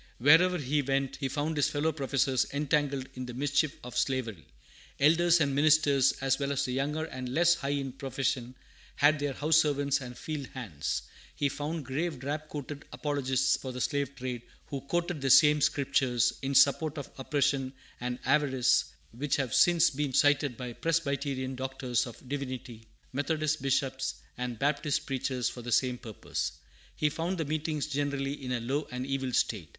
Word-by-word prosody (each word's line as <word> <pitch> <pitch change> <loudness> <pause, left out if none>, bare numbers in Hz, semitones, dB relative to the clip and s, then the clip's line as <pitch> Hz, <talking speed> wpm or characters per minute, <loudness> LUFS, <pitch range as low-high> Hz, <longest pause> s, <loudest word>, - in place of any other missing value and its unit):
Wherever 165 +8 +5
he 145 -1 0
went, 135 0 -1
he 135 - -2
found 150 +4 -2
his 145 - +3
fellow 150 +2 0
professors 135 -3 +1
entangled 140 -2 0
in 130 -1 -6
the 125 - -7
mischief 145 +2 +1
of 125 0 -8
slavery. 115 - -1 0.5
Elders 170 +4 +5
and 140 -3 +1
ministers, 145 -2 +4
as 135 0 +1
well 140 0 -1
as 140 0 0
the 125 - -3
younger 150 +4 -1
and 130 -5 -6
less 170 +6 +4
high 140 -5 -3
in 140 -2 -1
profession, 130 -1 -2 0.4
had 150 +1 +4
their 145 -1 -1
house 155 +3 +3
servants 145 -2 +2
and 125 -1 -8
field 150 -4 -5
hands. 100 - -3 0.3
He 145 - +1
found 150 +2 -4
grave 150 +4 -2
drab 150 +4 -4
coated 145 0 -6
apologists 135 -3 +1
for 130 - -6
the 125 - -6
slave 140 +2 -1
trade, 125 -2 -4 0.2
who 140 -2 -5
quoted 170 +2 -2
the 135 - 0
same 150 +2 +7
Scriptures, 130 -4 +2
in 135 +1 -2
support 150 +3 +4
of 140 - -6
oppression 135 -1 0 0.3
and 125 0 -3
avarice, 130 -4 +3 0.3
which 140 +5 -1
have 130 -5 -2
since 175 -2 +5
been 140 -1 -2
cited 145 -3 +3
by 125 -2 -5
Presbyterian 140 -4 -1
doctors 130 -2 -2
of 120 +2 -12
divinity, 130 -4 -5 0.3
Methodist 155 +1 0
bishops; 135 0 0 0.2
and 125 -1 -4
Baptist 145 +3 0
preachers 130 -3 -1
for 120 - -5
the 120 +1 -6
same 125 +1 +2
purpose. 110 -4 -4 0.4
He 150 - +1
found 170 +5 -2
the 160 - -1
meetings 155 0 -2
generally 140 -1 -2
in 125 - -4
a 125 - 0
low 135 +6 -2
and 125 +1 -4
evil 135 -1 -2
state. 100 -11 0
140 Hz, 170 wpm, -29 LUFS, 130-150 Hz, 0.5 s, same